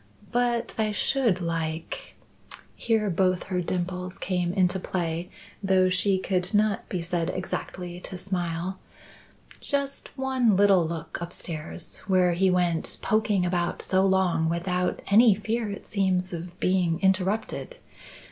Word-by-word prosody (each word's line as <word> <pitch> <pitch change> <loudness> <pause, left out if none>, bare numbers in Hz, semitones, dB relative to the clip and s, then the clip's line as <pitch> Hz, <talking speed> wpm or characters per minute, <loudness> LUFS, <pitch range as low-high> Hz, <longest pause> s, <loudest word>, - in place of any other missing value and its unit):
But 240 -1 0
I 215 -1 +2
should 220 -4 +1
like 165 -1 -3 0.3
" - - -31 0.3
here 220 -2 +1
both 185 0 +2
her 180 -1 -2
dimples 180 +1 -3
came 180 -2 -1
into 185 0 +2
play 170 -1 -3 0.3
though 190 -2 +3
she 190 +1 +2
could 185 0 -1
not 210 -1 +1
be 180 -3 -2
said 170 0 -1
exactly 180 -1 -4
to 185 - -7
smile 180 0 -3 0.8
"just 280 -1 -3
one 260 -5 +2
little 195 -4 +5
look 165 -1 -5
upstairs, 165 -2 -5
where 185 -2 +4
he 190 +2 +3
went 175 -2 +1
poking 215 -4 +2
about 175 -1 0
so 190 0 +2
long 185 -4 +2
without 180 +2 -1
any 215 +1 +6
fear 220 +2 -2
it 200 - -7
seems 185 -2 0
of 175 +1 -7
being 180 -3 +1
interrupted. 195 - 0
185 Hz, 135 wpm, -26 LUFS, 175-200 Hz, 0.8 s, any